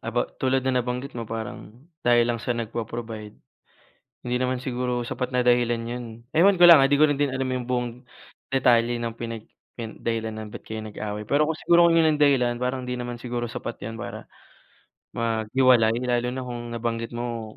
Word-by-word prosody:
about 115 +2 -3
tulad 130 0 +1
ng 130 -1 +2
nabanggit 125 +3 -4
mo 115 -2 -6
parang 115 +2 -7 0.2
dahil 120 -1 +4
lang 115 -1 -1
siya 120 -1 -2
nagpo-provide. 115 -1 -5 0.9
Hindi 120 - 0
naman 130 0 0
siguro 125 -1 -2
sapat 125 -1 -3
na 125 -1 +1
dahilan 120 -1 +3
'yon. 120 +1 -4 0.3
Ewan 185 +3 +5
ko 175 - +9
lang 165 -5 +9
ha, 135 - +3
'di 145 - +5
ko 155 - +7
din 145 -1 0
alam 130 0 -2
yung 130 -1 -2
buong 125 -1 0 0.6
detalye 120 -2 +3
ng 115 -1 -3
pinag 115 -2 -6 0.3
pi 120 - -4
dahilan 115 -1 -3
ng 110 - -8
ba't - - -9
kayo 110 0 -5
nag-away 105 0 -5
pero 145 +8 +2
kung 160 - -1
siguro 170 +2 +5
'yan 160 -2 +4
ang - - -12
dahilan 130 -5 +3
parang 125 +1 -1
hindi 125 0 -4
naman 120 0 -4
siguro 120 -1 -3
sapat 120 0 -6
'yan 115 +2 -6
para 115 - -7 0.9
maghiwalay 115 +1 +3
lalo 120 -1 +1
na 130 +1 -5
kung 120 -1 -6
nabanggit 115 0 -3
mo 120 -2 -5
120 Hz, 190 wpm, -25 LUFS, 115-130 Hz, 0.9 s, ko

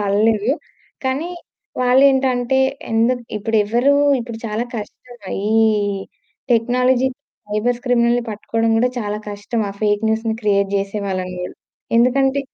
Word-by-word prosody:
పడ‌లేదు. 210 +2 +2 0.5
కానీ 275 +7 -1 0.5
వాళ్ళేంటంటే 260 0 +3 0.3
ఎందుకు 235 +2 +2
ఇప్పుడు 220 +2 -1
ఎవరు 240 +7 +3 0.3
ఇప్పుడు 230 -1 -7
చాలా 220 +2 -2
కష్టమే 220 -1 -9 0.2
ఈ 220 - +4 0.9
టెక్నాలజీ 250 +2 +2 0.4
సైబర్స్ 235 +4 -1
క్రిమినల్‌ని 240 0 +3
పట్టుకోవడం 225 +2 -1
కూడా 250 - +3
చాలా 210 -2 -3
కష్టం. 205 +3 -3
ఆ - - -7
ఫేక్ 205 0 +1
న్యూస్‌ని 220 0 0
క్రియేట్ 200 -2 +2
చేసేవాళ్ళని 195 -2 -3
కూడా. 180 - -7 0.4
ఎందుకంటే 270 +3 +3
230 Hz, 115 wpm, -19 LUFS, 210-250 Hz, 0.9 s, ఈ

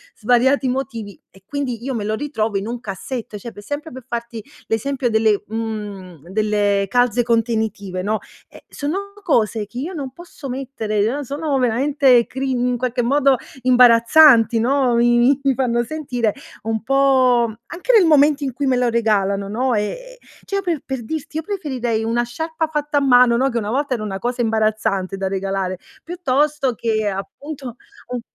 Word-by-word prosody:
svariati 250 +4 +2
motivi, 245 -6 -4
e 195 0 -20
quindi 255 -5 -4
io 265 0 -3
me 210 - -2
lo 215 - -1
ritrovo 225 -7 -2
in 195 +3 -4
un 240 +1 -4
cassetto, 220 +1 -6
cioè 230 +3 -8
per 205 - -12
sempre. 290 +6 -5
Per 255 -1 -10
farti 235 -3 -5 0.2
l'esempio 255 +3 -1
delle, 220 -2 +2
mhmm, 205 -7 -6
delle 205 -1 +1
calze 245 +2 +2
contenitive, 220 -5 -1
no, 215 +1 0 0.3
eh, - - -15
sono 390 +8 -4
cose 220 - +1
che 240 - -12
io 335 +8 -4
non 275 -5 -5
posso 300 -3 -10
mettere, 245 -1 -2
sono 285 +2 -2
veramente 255 0 +3
crin 260 -2 -2
in 245 -1 0
qualche 250 0 -1
modo 275 +1 +3 0.2
imbarazzanti, 240 0 +6
no, 255 0 +2
mi 240 +3 +4
mi 275 - +3
fanno 240 -2 +1
sentire 245 -6 -2 0.3
un 220 0 -2
po', 260 -2 +3 0.2
anche 365 +8 -1
nel 390 -5 +6
momento 295 -1 +4
in 265 - -1
cui 280 +3 -2
me 255 -2 +2
lo 245 -1 +2
regalano, 200 -4 +1
no, 245 +5 0
è 210 0 0
è - - -12 0.3
cioè, 395 0 -2
per 340 -6 -2
per 265 -3 -4
dirti, 315 +1 -5
io 320 - -2
preferirei 260 - -2
una 235 +2 0
sciarpa 320 +6 -3
fatta 295 -1 -2
a 285 - +3
mano, 250 -3 +5
no, 265 +2 +2
che 235 - -3
una 210 -1 -4
volta 275 +2 0
era 230 -4 -3
una 195 -2 -4
cosa 245 +2 -2
imbarazzante 215 -4 0
da 195 0 -2
regalare 195 -1 -2 0.3
piuttosto 300 -5 0
che 220 -2 -1
appunto 255 +6 -6 0.3
un 250 -1 -4
245 Hz, 170 wpm, -20 LUFS, 220-275 Hz, 0.3 s, imbarazzanti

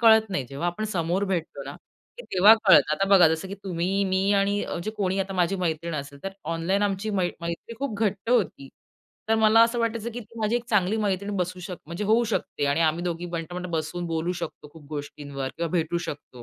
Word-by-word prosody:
कळत 220 -2 +6
नाही. 145 -8 -1
जेव्हा 140 +5 -3
आपण 175 +5 -3
समोर 185 -2 0
भेटतो 180 -4 -3
ना, - - -7 0.4
तेव्हा 205 - +6
कळतं. 185 -6 +6
आता 195 +4 0
बघा, 185 -5 +7
जसं 160 +4 -2
की 195 - -5
तुम्ही, 190 +2 0
मी 190 +1 +1
आणि 200 +1 +2 0.2
जे 215 - -2
कोणी 190 -1 0
आता 195 0 -3
माझी 180 +1 +1
मैत्रीण 170 -2 -2
असेल, 140 -1 -6
तर 195 - -3 0.2
ऑनलाईन 185 +5 0
आमची 205 +1 -1
मै 185 -4 +1
मैत्री 170 +7 -5
खूप 275 -5 -3
घट्ट 210 +1 -1
होती. 185 - +1 0.6
तर 225 - +4
मला 220 +1 +6
असं 230 +1 +2
वाटायचं 230 0 -1
की 245 - -5
ती 230 +1 -13
माझी 220 +2 +2
एक 240 - -4
चांगली 205 -1 +2
मैत्रीण 200 -1 -1
बसू 180 0 -2
शक 180 0 -6
म्हणजे 170 +5 -4
होऊ 220 +3 +4
शकते 170 - -2
आणि 140 +4 +1
आम्ही 160 +1 +2
दोघी 175 0 -3
बट, 170 0 -5
बट 180 0 -4
बसून 165 +2 -2
बोलू 165 +1 -1
शकतो 150 - -7
खूप 155 -3 -14
गोष्टींवर 145 -2 -5
किंवा 170 0 -1
भेटू 170 -1 0
शकतो. 145 -7 -7
185 Hz, 210 wpm, -26 LUFS, 165-205 Hz, 0.6 s, बघा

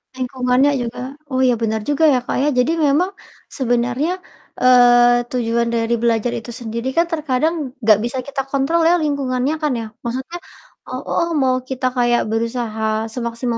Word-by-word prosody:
Lingkungannya 255 +2 +1
juga, 235 0 -5 0.3
oh, 260 -2 -1
iya, 250 -1 +4
benar 220 -1 -1
juga 295 +2 +1
ya, 265 -4 +4
Kak, - - -2
ya. 295 - +3
Jadi 250 +6 +2
memang 310 +5 +2 0.5
sebenarnya, 245 +4 0 0.4
eee, 245 -1 +5
tujuan 235 -1 0
dari 230 0 0
belajar 235 0 +1
itu 240 0 -6
sendiri 235 +1 -5
kan 335 - +4
terkadang 305 0 0 0.3
nggak 215 -1 +5
bisa 260 +2 -4
kita 280 -1 -2
kontrol 275 +5 +1
ya, 345 - +5
lingkungannya 275 -1 -1
kan 300 -1 +1
ya, - - -5 0.2
maksudnya 260 +8 -4 0.5
eee, - - -5
heeh, 340 -1 0
mau 260 -1 +2
kita 260 -1 -1
kayak 240 -1 +3
berusaha 225 -1 -2 0.3
semaksimal 235 0 -3
250 Hz, 160 wpm, -19 LUFS, 235-275 Hz, 0.5 s, eee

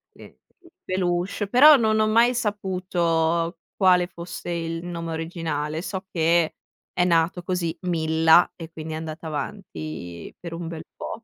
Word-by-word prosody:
il - - -15 0.4
peluche, 185 +2 -1
però 290 +8 +8
non 220 -2 +2
ho 215 - +3
mai 235 +3 +4
saputo 175 -6 0 0.2
quale 180 -2 +4
fosse 175 0 -8
il 165 -1 -3
nome 170 -2 -5
originale. 160 -2 -3
So 190 -1 -5
che 165 -1 +2 0.4
è 180 - +1
nato 170 +1 +2
così, 180 -3 -2
Milla 160 -1 +4
e 165 -1 -9
quindi 160 -1 -7
è - - -3
andata 160 0 -6
avanti 85 - -6
per 170 -1 -7
un 165 0 -5
bel 165 -1 -6
po'. - - -7
170 Hz, 145 wpm, -24 LUFS, 160-185 Hz, 0.4 s, però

